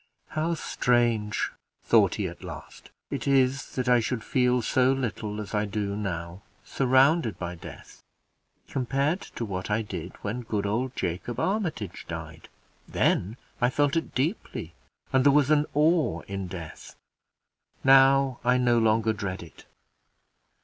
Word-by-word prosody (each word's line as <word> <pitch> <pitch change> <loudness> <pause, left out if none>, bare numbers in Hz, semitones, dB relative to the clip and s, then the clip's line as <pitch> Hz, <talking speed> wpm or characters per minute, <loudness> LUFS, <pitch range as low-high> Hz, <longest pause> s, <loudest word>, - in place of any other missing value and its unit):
"How 160 +2 -1
strange," 120 -7 +1 0.3
thought - - +4
he - - -2
at - - -10
last, - - -10 0.2
"it - - -3
is, 135 0 +2
that 130 -1 -1
I 125 -1 +5
should 115 0 -2
feel 125 +1 +2
so 130 +2 +3
little 110 -5 -3
as 105 0 -7
I 105 0 +1
do 100 -1 -2
now, 90 -3 -4 0.2
surrounded 135 - +3
by 90 -1 -4
death, 85 - -12 0.7
compared 140 +7 0
to 115 - -6
what 95 -2 -4
I 110 +2 +1
did 90 -4 -6
when 110 +5 -3
good 105 -3 -2
old 120 +6 -1
Jacob 90 +6 -3
Armitage 165 - -2
died! 80 -1 -8 0.4
Then 105 +7 +1 0.2
I 120 - +4
felt 145 +2 +1
it 165 - -2
deeply, 130 - -2 0.4
and 130 -1 +4
there 140 - +6
was 145 0 +3
an 150 -1 +3
awe 150 - +2
in 100 -1 -5
death. 85 -3 -9 0.9
Now 135 -1 +5
I 125 +1 +3
no 120 -2 +3
longer 110 0 +2
dread 95 -3 -4
it. 80 -5 -15
120 Hz, 145 wpm, -27 LUFS, 100-135 Hz, 0.9 s, there